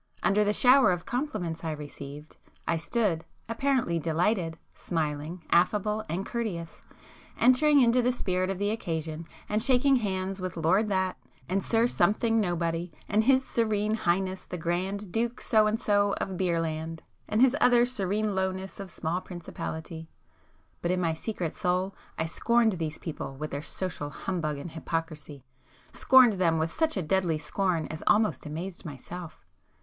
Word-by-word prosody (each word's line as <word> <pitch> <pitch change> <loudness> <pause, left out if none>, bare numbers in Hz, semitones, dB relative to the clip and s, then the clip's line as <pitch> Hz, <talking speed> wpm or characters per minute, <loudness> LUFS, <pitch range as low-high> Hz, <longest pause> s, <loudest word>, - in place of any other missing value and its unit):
Under 210 +2 +3
the 205 - +2
shower 255 +1 +6
of 175 -1 -2
compliments 215 - -3
I 165 - -2
received, 145 0 -9 0.3
I 170 - +2
stood, 170 -1 0 0.2
apparently 230 -7 0
delighted,—smiling, 165 -2 -2
affable 210 +4 +2
and 185 +4 -2
courteous,—entering 235 - 0
into 245 0 +4
the 245 +1 +2
spirit 185 -6 -1
of 195 - -2
the 205 +2 0
occasion, 160 -6 -3 0.2
and 210 +1 0
shaking 265 +2 +4
hands 190 -3 -2
with 185 -1 -4
my 165 - -4
Lord 195 +7 +3
That, 190 -2 0 0.3
and 190 +2 0
Sir 230 0 +2
Something 225 +1 +2
Nobody, 170 -2 -1 0.2
and 215 +1 +2
His 265 0 +4
Serene 215 -2 0
Highness 190 -2 -1
the 180 - -5
Grand 185 +4 -2
Duke 235 +4 -1
So 215 -2 +3
and 220 +1 0
So 205 -1 +2
of 190 - -3
Beer 175 -2 +1
Land, 160 0 -4 0.3
and 215 - +1
His 260 +2 +5
other 245 -1 +6
Serene 210 -3 -1
Lowness 190 0 -3
of 195 -1 -6
Small 170 +1 -2
Principality,—but 165 -1 -8
in 180 0 +1
my 165 -2 +1
secret 170 -1 -4
soul 185 0 0 0.2
I 160 - 0
scorned 235 +7 +2
these 160 -4 -3
people 150 -4 -6
with 150 +3 -5
their 140 - -3
social 170 -3 -4
humbug 155 -1 -3
and 150 +4 -7
hypocrisy,—scorned 160 - +1
them 165 -3 +3
with 160 +1 0
such 320 -6 0
a 185 - -1
deadly 170 -1 +1
scorn 165 +2 -1
as 160 - -6
almost 210 -6 +2
amazed 170 +5 -6
myself. 170 +2 -9
185 Hz, 155 wpm, -28 LUFS, 165-215 Hz, 0.3 s, shower